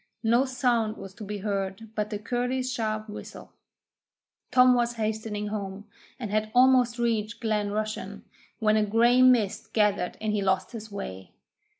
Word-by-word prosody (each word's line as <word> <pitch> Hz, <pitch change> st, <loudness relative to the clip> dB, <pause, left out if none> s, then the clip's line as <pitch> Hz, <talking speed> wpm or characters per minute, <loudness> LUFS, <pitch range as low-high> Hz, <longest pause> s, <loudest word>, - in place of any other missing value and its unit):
No 235 Hz, +4 st, +3 dB
sound 240 Hz, -4 st, 0 dB
was 195 Hz, -1 st, -9 dB
to 215 Hz, -, -10 dB
be 205 Hz, +1 st, -5 dB
heard 195 Hz, +1 st, -3 dB
but 210 Hz, -1 st, -2 dB
the 210 Hz, -, -3 dB
curlew's 250 Hz, +3 st, -2 dB
sharp 215 Hz, -2 st, -2 dB
whistle. 210 Hz, -, -10 dB, 1.0 s
Tom 250 Hz, 0 st, +6 dB
was 240 Hz, -1 st, +1 dB
hastening 215 Hz, -1 st, -3 dB
home, 200 Hz, -1 st, -5 dB, 0.3 s
and 220 Hz, -5 st, -5 dB
had 215 Hz, 0 st, 0 dB
almost 250 Hz, -1 st, +5 dB
reached 230 Hz, -1 st, -1 dB
Glen 215 Hz, -3 st, 0 dB
Rushen, 215 Hz, +1 st, -4 dB, 0.3 s
when 215 Hz, -1 st, +2 dB
a 215 Hz, -, +3 dB
grey 235 Hz, +4 st, +4 dB
mist 245 Hz, -6 st, +3 dB
gathered 205 Hz, -4 st, +1 dB
and 215 Hz, -1 st, -1 dB
he 210 Hz, -, 0 dB
lost 190 Hz, -1 st, 0 dB
his 220 Hz, -2 st, -8 dB
way. 95 Hz, -, -7 dB
215 Hz, 160 wpm, -27 LUFS, 210-235 Hz, 1.0 s, Tom